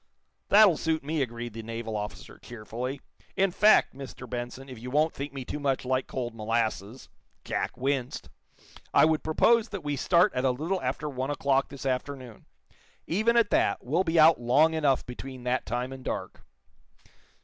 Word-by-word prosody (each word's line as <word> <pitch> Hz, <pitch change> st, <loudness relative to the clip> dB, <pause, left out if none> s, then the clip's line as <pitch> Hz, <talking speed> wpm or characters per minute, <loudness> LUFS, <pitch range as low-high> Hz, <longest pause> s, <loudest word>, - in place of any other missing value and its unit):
"That'll 200 Hz, -5 st, +7 dB
suit 160 Hz, -2 st, -1 dB
me," 155 Hz, +1 st, -1 dB
agreed 120 Hz, -2 st, -4 dB
the 115 Hz, -, -6 dB
naval 115 Hz, 0 st, -5 dB
officer, 105 Hz, 0 st, -6 dB
cheerfully. 120 Hz, +4 st, -6 dB, 0.3 s
"In 195 Hz, -1 st, +2 dB
fact, 210 Hz, +4 st, +4 dB
Mr. 130 Hz, -2 st, -9 dB
Benson, 120 Hz, +3 st, -6 dB
if 130 Hz, -4 st, -10 dB
you 125 Hz, +2 st, -7 dB
won't 155 Hz, +4 st, +2 dB
think 140 Hz, +2 st, -6 dB
me 135 Hz, -2 st, -7 dB
too 150 Hz, -, -5 dB
much 135 Hz, -3 st, -1 dB
like 130 Hz, 0 st, 0 dB
cold 120 Hz, -3 st, -4 dB
molasses" 110 Hz, 0 st, -2 dB, 0.4 s
Jack -, -, -3 dB
winced 135 Hz, -, -2 dB, 0.7 s
"I -, -, +7 dB
would 160 Hz, -1 st, +1 dB
propose 225 Hz, +8 st, +3 dB
that 200 Hz, -6 st, -6 dB
we 145 Hz, -1 st, -2 dB
start 175 Hz, +7 st, +3 dB
at 125 Hz, -, -1 dB
a 135 Hz, -, +3 dB
little 160 Hz, +9 st, -2 dB
after 130 Hz, +4 st, -3 dB
one 135 Hz, -1 st, -3 dB
o'clock 140 Hz, -1 st, +1 dB
this 140 Hz, -1 st, -9 dB
afternoon. 130 Hz, -2 st, -4 dB, 0.6 s
Even 220 Hz, +7 st, +1 dB
at 230 Hz, -3 st, +3 dB
that, -, -, +1 dB
we'll 160 Hz, +9 st, +1 dB
be 165 Hz, -2 st, +1 dB
out 155 Hz, -4 st, +6 dB
long 145 Hz, +7 st, +4 dB
enough 145 Hz, -5 st, +1 dB
between 130 Hz, +1 st, -8 dB
that 125 Hz, +1 st, -1 dB
time 125 Hz, +3 st, -3 dB
and 130 Hz, -1 st, -10 dB
dark." -, -, -5 dB
135 Hz, 175 wpm, -27 LUFS, 125-155 Hz, 0.7 s, That'll